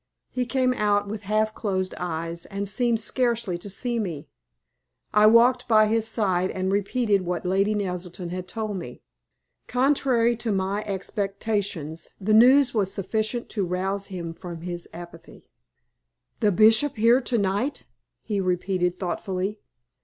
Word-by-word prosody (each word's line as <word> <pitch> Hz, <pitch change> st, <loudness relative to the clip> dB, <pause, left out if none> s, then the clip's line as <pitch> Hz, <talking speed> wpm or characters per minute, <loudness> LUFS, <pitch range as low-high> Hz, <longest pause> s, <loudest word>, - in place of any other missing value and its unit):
He 250 Hz, -1 st, -2 dB
came 255 Hz, +1 st, +1 dB
out 205 Hz, -3 st, +1 dB
with 210 Hz, 0 st, -5 dB
half 215 Hz, 0 st, +1 dB
closed 190 Hz, -4 st, -2 dB
eyes, 170 Hz, -1 st, -4 dB
and 200 Hz, 0 st, -3 dB
seemed 230 Hz, +3 st, +2 dB
scarcely 235 Hz, -4 st, 0 dB
to 200 Hz, -, -7 dB
see 235 Hz, +4 st, -1 dB
me. 165 Hz, -8 st, -4 dB, 0.9 s
I 210 Hz, 0 st, +6 dB
walked 240 Hz, +3 st, +5 dB
by 215 Hz, -2 st, +5 dB
his 220 Hz, +1 st, 0 dB
side, 190 Hz, -5 st, +1 dB
and 190 Hz, 0 st, -2 dB
repeated 205 Hz, +1 st, +1 dB
what 180 Hz, 0 st, -3 dB
Lady 195 Hz, +3 st, +1 dB
Naselton 180 Hz, -3 st, -4 dB
had 180 Hz, 0 st, -5 dB
told 215 Hz, 0 st, -4 dB
me. 145 Hz, -9 st, -9 dB, 0.6 s
Contrary 250 Hz, -2 st, +2 dB
to 230 Hz, -1 st, -2 dB
my 195 Hz, +1 st, -1 dB
expectations, 195 Hz, -5 st, -3 dB
the 215 Hz, +2 st, 0 dB
news 255 Hz, +5 st, +6 dB
was 200 Hz, -4 st, 0 dB
sufficient 220 Hz, +5 st, -2 dB
to 205 Hz, -, -1 dB
rouse 190 Hz, +2 st, -2 dB
him 170 Hz, -4 st, -6 dB
from 170 Hz, -1 st, -8 dB
his 175 Hz, 0 st, -5 dB
apathy. 170 Hz, 0 st, -12 dB, 0.9 s
"The 210 Hz, -, +3 dB
Bishop 220 Hz, +8 st, +4 dB
here 230 Hz, +3 st, +4 dB
to 240 Hz, -1 st, 0 dB
night!" 205 Hz, +8 st, -1 dB, 0.4 s
he 205 Hz, -3 st, -1 dB
repeated, 180 Hz, -1 st, 0 dB
thoughtfully. 190 Hz, +2 st, -3 dB
205 Hz, 145 wpm, -25 LUFS, 185-225 Hz, 0.9 s, I